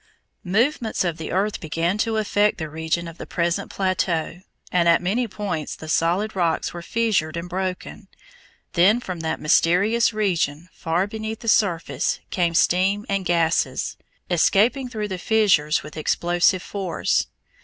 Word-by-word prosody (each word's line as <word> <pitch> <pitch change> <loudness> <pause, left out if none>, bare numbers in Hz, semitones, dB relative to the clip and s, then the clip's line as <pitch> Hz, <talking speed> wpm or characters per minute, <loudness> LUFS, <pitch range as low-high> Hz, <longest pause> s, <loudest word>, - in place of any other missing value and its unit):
Movements 230 +2 +1
of 170 -3 -2
the 160 - -5
earth 200 +4 0
began 170 +4 -1
to 220 0 0
affect 210 -1 +2
the 160 -3 -5
region 160 +2 -2
of 165 0 -11
the - - -7
present 170 +3 -1
plateau, 180 -3 -1 0.3
and 170 -1 +3
at 170 - +5
many 220 +7 0
points 190 -7 -4
the 160 - -10
solid 175 +7 +1
rocks 170 -3 0
were 175 - -6
fissured 185 -6 0
and 170 +1 -5
broken. 185 0 -5 0.7
Then 195 +7 +4
from 185 -8 -6
that 160 0 -2
mysterious 200 +10 +3
region 175 -6 -1
far 170 +3 -1
beneath 220 +1 -6
the 230 - -9
surface 170 - +1
came 170 -2 0
steam 195 +5 +2
and 195 -1 -1
gases, 170 -1 +1 0.3
escaping 220 - +2
through 215 -3 -4
the 185 -1 -4
fissures 180 -8 +2
with 150 - -10
explosive 175 +3 +1
force. 195 -4 -1
180 Hz, 150 wpm, -23 LUFS, 165-210 Hz, 0.7 s, at